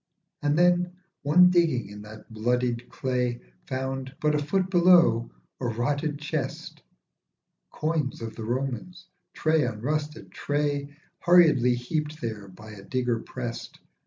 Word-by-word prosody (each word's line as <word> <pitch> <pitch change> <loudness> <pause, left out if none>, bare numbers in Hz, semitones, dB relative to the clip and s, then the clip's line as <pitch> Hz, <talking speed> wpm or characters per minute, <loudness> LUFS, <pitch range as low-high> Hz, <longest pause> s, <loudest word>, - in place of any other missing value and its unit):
And 145 +1 +1
then 175 0 +3 0.3
one 180 +5 +6
digging 165 - +2
in 105 0 -9
that 110 +1 -12
bloodied 120 +1 -1
clay 125 -2 -1 0.3
Found, 130 0 -4
but 150 0 +2
a 150 0 0
foot 185 +5 0
below, 170 -10 +5 0.3
a 125 - -2
rotted 145 +6 -1
chest. 150 0 -5 0.9
Coins 155 -4 -2
of 115 -1 -6
the 115 - -6
Romans, 130 +7 -4 0.3
tray 155 -1 +2
on 105 - -3
rusted 150 +2 -3
tray, 145 0 -2 0.2
Hurriedly 155 -9 +5
heaped 150 +5 -3
there 110 -4 -5
by 105 +3 -12
a 105 -2 -10
digger 125 +2 -1
prest. 120 -1 -7
135 Hz, 130 wpm, -26 LUFS, 120-155 Hz, 0.9 s, one